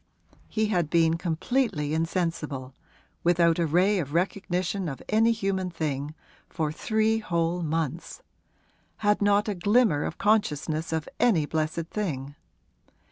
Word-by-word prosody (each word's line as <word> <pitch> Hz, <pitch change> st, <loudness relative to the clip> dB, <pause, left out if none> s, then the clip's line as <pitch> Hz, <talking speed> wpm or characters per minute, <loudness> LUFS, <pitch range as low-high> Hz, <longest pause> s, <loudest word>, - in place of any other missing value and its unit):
He 215 Hz, -1 st, 0 dB
had 175 Hz, -7 st, +1 dB
been 165 Hz, 0 st, +3 dB
completely 170 Hz, -, -1 dB
insensible 160 Hz, -5 st, -2 dB, 0.5 s
without 170 Hz, -1 st, +3 dB
a 170 Hz, -, +2 dB
ray 185 Hz, +6 st, +3 dB
of 145 Hz, -2 st, -4 dB
recognition 185 Hz, 0 st, -1 dB
of 135 Hz, -, -7 dB
any 225 Hz, +2 st, +4 dB
human 195 Hz, -4 st, -1 dB
thing 150 Hz, -3 st, -3 dB, 0.3 s
for 155 Hz, -3 st, -2 dB
three 220 Hz, +6 st, +1 dB
whole 170 Hz, -3 st, -1 dB
months; 165 Hz, -, -3 dB, 0.8 s
had 210 Hz, 0 st, +3 dB
not 205 Hz, +1 st, +3 dB
a 210 Hz, -, 0 dB
glimmer 200 Hz, -4 st, +3 dB
of -, -, -5 dB
consciousness 165 Hz, -7 st, 0 dB
of 160 Hz, -1 st, -2 dB
any 185 Hz, -11 st, +3 dB
blessed 160 Hz, +1 st, -2 dB
thing. 145 Hz, -10 st, -3 dB
170 Hz, 130 wpm, -27 LUFS, 155-205 Hz, 0.8 s, any